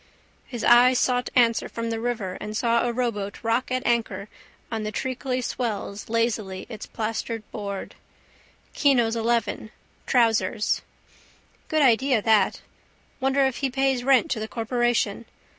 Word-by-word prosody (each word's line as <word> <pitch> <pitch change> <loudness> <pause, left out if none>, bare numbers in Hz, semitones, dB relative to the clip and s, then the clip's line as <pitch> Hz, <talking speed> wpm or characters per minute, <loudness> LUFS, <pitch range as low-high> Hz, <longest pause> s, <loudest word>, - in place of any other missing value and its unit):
His 240 -3 -6
eyes 245 +1 +6
sought 250 0 +1
answer 235 -2 +3
from 230 0 -4
the 225 - -2
river 220 -6 -3
and 210 0 -4
saw 235 0 +2
a - - 0
rowboat 230 -5 -3
rock 230 +3 0
at 255 0 -1
anchor 220 -4 0 0.4
on 225 -1 -2
the 215 0 -3
treacly 255 +2 -2
swells 215 -5 -4
lazily 220 -5 -1
its 220 -3 -8
plastered 225 0 -3
board. 200 -2 -5 0.8
Kino's 240 -6 +3
11/— 230 -1 -1 0.4
Trousers 225 -3 +2 0.9
Good 310 -1 +2
idea 255 0 +4
that. 220 0 +2 0.6
Wonder 270 +1 +2
if 265 -2 -1
he 270 - -1
pays 265 -1 0
rent 275 +4 +3
to 225 - 0
the 215 - -4
corporation. 235 -2 0
235 Hz, 140 wpm, -25 LUFS, 220-250 Hz, 0.9 s, eyes